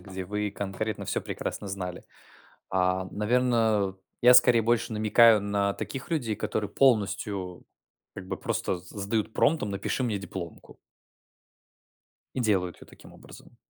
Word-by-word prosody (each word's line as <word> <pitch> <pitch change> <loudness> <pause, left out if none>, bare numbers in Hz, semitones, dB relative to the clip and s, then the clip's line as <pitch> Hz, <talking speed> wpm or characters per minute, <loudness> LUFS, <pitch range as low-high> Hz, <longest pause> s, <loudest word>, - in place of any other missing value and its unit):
где 95 -2 -7
вы 105 +2 -2
конкретно 100 +2 -4
всё - - -1
прекрасно - - -5
знали, 90 -2 -5 0.7
а, 95 0 +1
наверно, 110 -3 +1 0.3
я 125 +1 +8
скорее 125 -2 +7
больше 120 0 +1
намекаю 110 +1 +5
на 100 0 0
таких 135 +3 -6
людей, 120 -10 -1
которые 105 0 -2
полностью 100 -7 +1 0.5
как 95 - -8
бы - - -3
просто 90 - -2
с 90 - -16
сдают 105 +2 -2
промптом: 145 -7 +1
напиши 100 +6 -2
мне 110 -5 -1
дипломку. 95 -3 -8 1.6
И 130 - -1
делают 95 -6 +1
её - - -15
таким - - -16
образом. - - -15
105 Hz, 135 wpm, -27 LUFS, 95-115 Hz, 1.6 s, я